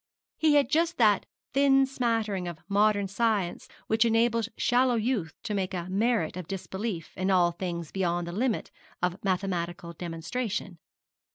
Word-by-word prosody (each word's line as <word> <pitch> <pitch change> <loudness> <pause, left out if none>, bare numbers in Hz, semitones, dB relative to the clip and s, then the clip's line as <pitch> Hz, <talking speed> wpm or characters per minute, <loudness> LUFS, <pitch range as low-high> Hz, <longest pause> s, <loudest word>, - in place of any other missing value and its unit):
He 310 -2 +4
had 285 -4 +5
just 335 +2 +2
that 210 -5 +4 0.3
thin 270 0 +5
smattering 225 -8 -1
of 170 -2 -5
modern 205 0 +3
science 205 -3 0 0.2
which 220 +1 +3
enables 230 0 +2
shallow 250 0 +3
youth 220 -8 -1
to 225 -3 -3
make 190 -1 -1
a 175 -1 -3
merit 215 -4 +1
of 180 -3 -6
disbelief 190 -2 -5
in 185 +1 -1
all 180 -2 +4
things 170 -2 -5
beyond 175 -2 0
the 170 - -5
limit 230 +5 -1 0.3
of 180 +2 -1
mathematical 175 -3 -2
demonstration. 175 +3 -4
200 Hz, 150 wpm, -28 LUFS, 175-235 Hz, 0.3 s, had